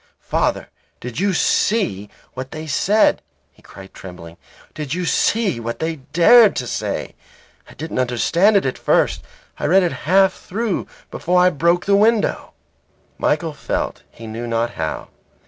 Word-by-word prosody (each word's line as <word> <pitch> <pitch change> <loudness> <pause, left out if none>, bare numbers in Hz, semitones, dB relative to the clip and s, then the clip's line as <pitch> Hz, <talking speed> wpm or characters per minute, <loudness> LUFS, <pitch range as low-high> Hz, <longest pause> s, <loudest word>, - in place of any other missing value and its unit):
"Father, - - -1 0.3
did 125 +3 -6
you 200 +1 +1
see 160 - 0 0.2
what 130 +1 -6
they 155 +2 -7
said?" 200 +9 +2 0.3
he - - -25
cried, 95 0 -14
trembling. 90 -3 -11 0.4
"Did 150 0 -4
you 180 0 -2
see 205 - +1
what 115 0 -5
they 160 0 -3
dared 175 - +5
to 125 - -3
say? - - -4 0.6
I - - -15
didn't 160 -3 -5
understand 165 - +2
it 195 - 0
at 130 - -2
first. - - +1 0.4
I - - -3
read 190 +4 +4
it 175 - 0 0.2
half 190 0 +5
through 215 +1 -3 0.2
before 180 +1 +1
I 180 0 +5
broke 170 +3 +1
the 200 - +3
window." 215 +1 +1 0.7
Michael 165 -3 0
felt - - -4
he 115 - -13
knew 115 +2 -6
not 115 0 -1
how. 80 -6 -5
160 Hz, 155 wpm, -20 LUFS, 120-195 Hz, 0.7 s, dared